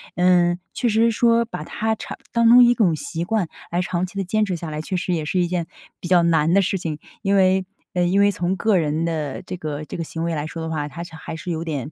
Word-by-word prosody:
嗯， 175 -1 +3 0.2
确 240 - 0
实 225 +2 +3
说 230 +1 +3
把 235 - -6
它 220 +1 -1
长 220 - -7
当 235 -1 +4
成 245 +1 +9
一 240 0 +6
种 200 -9 +2
习 165 +2 -4
惯 200 0 0 0.2
来 175 - -1
长 180 0 -1
期 190 - -12
地 195 - 0
坚 215 +4 +1
持 195 -4 -1
下 165 -2 -6
来， 150 0 -3
确 185 - -4
实 180 0 -1
也 160 -3 -1
是 180 +4 0
一 175 - +3
件 170 -2 -2 0.3
比 - - -6
较 175 -1 +4
难 165 -1 +3
的 195 - +5
事 195 +1 0
情。 160 -4 -4 0.2
因 200 -1 +1
为， 190 -1 +3 0.3
呃， 180 - +1
因 185 +3 +2
为 200 0 +5
从 180 -1 -1
个 200 +2 +2
人 155 0 0
的 155 -5 -3
这 185 - -7
个， 155 -3 -5
这 - - -7
个 165 - -2
行 165 0 -5
为 170 0 -1
来 150 0 -3
说 165 +1 -6
的 160 - -4
话， 150 -2 -2
它 160 +4 -7
是 170 -2 -11
还 160 - -7
是 170 +2 -5
有 165 -1 -2
点 150 -4 -4
175 Hz, 290 characters per minute, -22 LUFS, 160-195 Hz, 0.3 s, 成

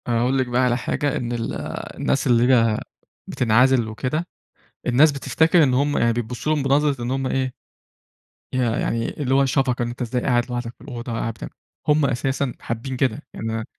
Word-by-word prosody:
هاقول 120 +3 +1
لِك 130 -1 +1
بقى 125 +1 +1
على 125 -1 +2
حاجة، 145 +3 -1
إن 120 -1 -3
ال 115 -1 -3 0.4
الناس 135 - 0
اللي 120 +1 +4
هي 115 -3 +3 0.5
بتنعزل 125 +1 +3
وكده، 130 +10 -3 0.6
الناس 140 +5 +5
بتفتكر 160 +5 +3
إن 130 -4 +3
هم 145 +3 +1
يعني 115 0 +3
بيبصوا 120 +5 -2
لهم 150 - -1
بنظرة 140 -1 +2
إن 120 - -2
هم 135 0 -1
إيه، 130 -1 -1 1.0
ي - - 0
يعني 115 -1 0
اللي 130 -1 +1
هو 135 0 +4
شفقة، 130 -2 +1
أنتَ 120 +2 -5
إزاي 125 +1 -1
قاعد 120 -2 +2
لوحدك 120 -1 -4
في - - -24
الأوضة 125 -2 -7
قاعد 115 0 -2
بت - - -8 0.4
هم 150 -1 +4
أساسًا 135 0 -1
حابّين 125 +3 -4
كده، 135 +2 0
يعني 115 0 -4
أنا 110 0 -3
125 Hz, 185 wpm, -22 LUFS, 120-135 Hz, 1.0 s, الناس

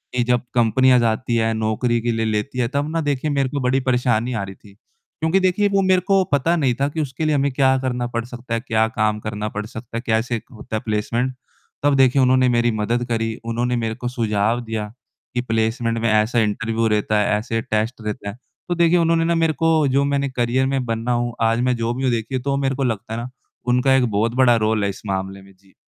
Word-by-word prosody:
कि 120 - +2
जब 125 0 +1
कंपनियाँ 125 +2 +4
जाती 115 +1 0
हैं 115 0 +1
नौकरी 110 +2 0
के 120 - 0
लिए 115 -1 -1
लेती 110 +4 -2
हैं, 120 - +1
तब 140 +3 -1
ना 165 0 0
देखिए 145 0 -1
मेरे 140 -2 +1
को 140 +1 -3
बड़ी 130 +1 +2
परेशानी 125 -2 +1
आ 110 -4 -2
रही 95 0 -8
थी 100 0 -18
क्योंकि 160 - -3
देखिए 185 +2 +2
वो 195 0 +2
मेरे 185 -1 +3
को 195 -2 +4
पता 145 +5 +2
नहीं 135 -7 +1
था 140 - +3
कि 155 +2 -3
उसके 140 +2 -3
लिए 155 -1 +2
हमें 140 0 +1
क्या 130 0 +3
करना 125 -2 -2
पड़ 115 -1 -3
सकता 120 -1 -7
है, 115 - +1
क्या 110 -3 +1
काम 110 -1 0
करना 105 0 -4
पड़ 105 0 -5
सकता 115 +1 -8
है, 115 - -3
कैसे 115 +1 0
होता 110 -1 -7
है 110 - -1
प्लेसमेंट 115 +4 -1 0.5
तब 145 -1 +3
देखिए 135 0 +4
उन्होंने 130 0 +4
मेरी 120 0 +2
मदद 115 +3 -1
करी, 115 -1 -1
उन्होंने 120 +2 -1
मेरे 115 -2 -2
को 125 - -5
सुझाव 115 -1 0
दिया 110 -2 -3 0.5
कि 125 - 0
प्लेसमेंट 115 0 -1
में 115 0 +1
ऐसा 110 +3 +2
इंटरव्यू 115 +1 0
रहता 105 0 +1
है, 105 0 +2
ऐसे 115 0 -2
टेस्ट 110 +1 -2
रहता 105 -1 -4
है, 100 - -8 0.3
तो 175 - +1
देखिए 170 0 +4
उन्होंने 165 0 +2
ना 170 0 +1
मेरे 165 -1 +2
को 160 -3 +3
जो 135 +1 +2
मैंने 140 0 0
करियर 130 +1 0
में 135 -1 -1
बना 115 +1 -2
हूँ, 120 0 0
आज 115 +1 +2
मैं 125 0 +1
जो 115 +1 -1
भी 130 +2 -4
हूँ 130 - +2
देखिए 115 +3 -2
तो 140 +2 -1
मेरे 135 -1 0
को 135 - -2
लगता 110 -3 -2
है 115 - -3
ना 120 - -6 0.4
उनका 125 +2 +3
एक 130 - +3
बहुत 110 +3 0
बड़ा 125 -2 +5
रोल 110 -1 +1
है 100 - +1
इस 100 - -7
मामले 95 0 -3
में, 95 0 -17
जी। 95 +1 -27
120 Hz, 240 wpm, -21 LUFS, 110-135 Hz, 0.5 s, बड़ा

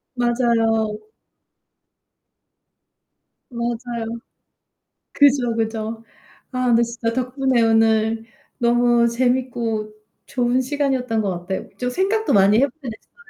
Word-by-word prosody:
맞아요. 230 -3 +1 2.5
맞아요. 235 -1 -4 1.1
그죠, 270 -5 +3
그죠. 225 0 -3 0.5
아 255 0 -1
근데 235 -1 +4
진짜 235 -1 -2
덕분에 255 0 0
오늘 225 0 +2 0.3
너무 240 0 +3
재밌고 235 -3 -1 0.3
좋은 250 0 +1
시간이었던 260 -4 -1
것 190 -4 -2
같아요. 190 +2 -5
좀 250 0 -2
생각도 405 - 0
많이 200 +2 +5
해 275 - +4
보게 270 0 -11
됐어요. 220 - -14
235 Hz, 215 characters per minute, -21 LUFS, 225-255 Hz, 2.5 s, 많이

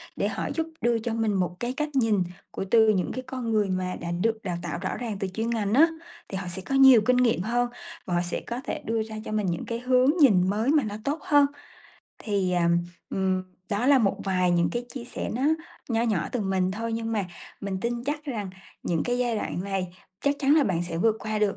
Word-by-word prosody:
để - - 0
họ - - -3
giúp 325 -1 -1
đưa 235 0 +2
cho 225 +1 -3
mình 225 -2 +1
một 180 -2 0
cái 245 +1 -2
cách 300 +2 -2
nhìn 220 -7 +3 0.3
của - - -4
từ 225 -2 +6
những 190 -4 +1
cái 255 - -4
con 255 -3 -3
người 210 -3 +2
mà 185 0 -1
đã 170 0 -3
được 220 +6 0
đào 175 -3 -2
tạo 170 0 -4
rõ 190 - -2
ràng 225 -5 -4
từ 195 - -1
chuyên 220 +5 -3
ngành 215 -3 0
á, 315 +6 +7 0.4
thì 195 - -4
họ 185 -2 -5
sẽ 175 +2 -5
có 270 - -3
nhiều 265 -4 +8
kinh 250 +3 +3
nghiệm 235 -7 +3
hơn 240 +3 0 0.4
và 180 - -3
họ 175 - +2
sẽ 175 - -3
có 240 +1 -3
thể - - -4
đưa 225 0 0
ra 220 0 -8
cho - - -5
mình 210 -2 0
những 170 -2 -2
cái 230 0 -3
hướng 255 +1 +3
nhìn 190 -9 +6
mới 220 +6 0
mà 300 -4 +4
nó 210 -1 -4
tốt 295 +3 -1
hơn. 290 -1 +5 0.7
Thì, 200 -4 -1
à, 175 -1 +2 0.4
ừm, 190 -1 0 0.3
đó 210 +5 0
là 280 -2 +6
một 205 -5 +2
vài 185 -2 +2
những 170 -1 +3
cái 240 0 -2
chia 245 -3 -5
sẻ - - -5
nó 255 - -2 0.5
nho 230 -2 +1
nhỏ 215 -8 0
từ 245 - -1
mình 190 -2 +1
thôi, 225 +3 -3
nhưng 225 0 -2
mà 205 -3 0 0.4
mình 195 -1 -3
tin 240 +1 -2
chắc 300 +2 -3
rằng 215 -9 -4 0.3
những 165 -2 0
cái 245 0 0
giai 240 -3 +1
đoạn 180 - -3
này 195 -2 -2 0.3
chắc 285 0 +2
chắn 280 +1 +4
là 305 - +5
bạn 175 -6 0
sẽ 165 - -3
vượt 220 +3 +3
qua 215 -1 -2
được 210 -2 +1
220 Hz, 250 wpm, -26 LUFS, 190-245 Hz, 0.7 s, nhiều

